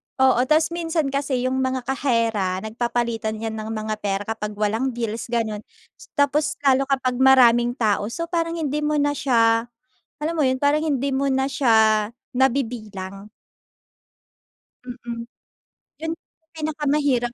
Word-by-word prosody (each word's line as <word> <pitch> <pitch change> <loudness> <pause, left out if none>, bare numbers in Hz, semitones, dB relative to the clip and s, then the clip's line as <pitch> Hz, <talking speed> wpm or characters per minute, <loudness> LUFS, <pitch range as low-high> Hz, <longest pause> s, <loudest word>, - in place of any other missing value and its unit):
oo 265 -2 +4
tas 315 +3 +3
minsan 325 -4 -1
kasi 275 -2 -1
yung 260 +1 0
mga 260 -1 -1
kahera 230 -8 0
nagpapalitan 230 -1 -2
'yan 225 +1 -4
ng 215 - -5
mga 215 0 -3
pera 200 -1 -2
kapag 210 -1 -4
walang 220 +5 -1
bills 230 -1 -3
ganun. 225 -3 -1 0.6
Tapos 285 +1 +2
lalo 270 -1 +3
kapag 255 -2 0
maraming 245 -2 +5
tao, 210 -4 +1
so 315 +9 -4
parang 335 -1 -1
hindi 300 -3 -1
mo 300 0 0
na 290 0 +2
siya 230 -4 +2 0.5
alam 310 +3 -2
mo 315 - +1
yun, 260 -1 +2
parang 290 +2 +2
hindi 280 -3 0
mo 275 +1 +1
na 265 0 +1
siya 220 -6 +3 0.2
nabibilang. 215 -7 -2 1.6
Mm. 240 -1 -7 0.8
'Yon 320 +1 -3
'yung - - -9 0.4
pinakamahirap 295 -5 0
255 Hz, 140 wpm, -23 LUFS, 225-285 Hz, 1.6 s, maraming